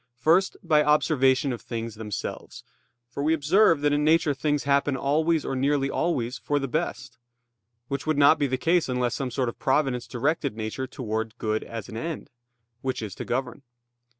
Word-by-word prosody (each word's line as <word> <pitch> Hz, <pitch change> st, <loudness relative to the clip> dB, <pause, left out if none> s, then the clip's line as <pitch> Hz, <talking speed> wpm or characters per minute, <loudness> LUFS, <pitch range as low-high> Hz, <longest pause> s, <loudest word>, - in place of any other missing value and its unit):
First, 165 Hz, +9 st, +2 dB
by 155 Hz, -3 st, +4 dB
observation 140 Hz, -2 st, +3 dB
of 120 Hz, -, -7 dB
things 115 Hz, -1 st, -5 dB
themselves: 105 Hz, -2 st, -6 dB, 0.4 s
for 120 Hz, +4 st, -6 dB
we 155 Hz, +3 st, +3 dB
observe 165 Hz, +1 st, +3 dB
that 145 Hz, 0 st, +2 dB
in 145 Hz, 0 st, +1 dB
nature 155 Hz, -1 st, +3 dB
things 145 Hz, +1 st, -1 dB
happen 140 Hz, -1 st, +1 dB
always 155 Hz, +4 st, +1 dB
or 135 Hz, -, -2 dB
nearly 135 Hz, +1 st, +1 dB
always 125 Hz, -7 st, -1 dB
for 145 Hz, -, -1 dB
the 135 Hz, -1 st, -1 dB
best; 125 Hz, -, -4 dB, 0.7 s
which 140 Hz, +3 st, -4 dB
would 155 Hz, -2 st, +1 dB
not 145 Hz, +2 st, +6 dB
be 145 Hz, -, +2 dB
the 130 Hz, 0 st, -1 dB
case 165 Hz, +2 st, +1 dB
unless 125 Hz, -1 st, 0 dB
some 135 Hz, -2 st, -3 dB
sort 125 Hz, +1 st, -1 dB
of 120 Hz, -, -5 dB
providence 135 Hz, -3 st, 0 dB
directed 140 Hz, -1 st, -1 dB
nature 110 Hz, +4 st, -4 dB
towards 110 Hz, -4 st, -4 dB
good 110 Hz, 0 st, -1 dB
as 115 Hz, -3 st, -7 dB
an 110 Hz, -, -7 dB
end; 165 Hz, +5 st, -5 dB, 0.5 s
which 130 Hz, -4 st, -3 dB
is 105 Hz, -3 st, -5 dB
to -, -, -7 dB
govern. 125 Hz, +2 st, -3 dB
140 Hz, 180 wpm, -26 LUFS, 125-150 Hz, 0.7 s, not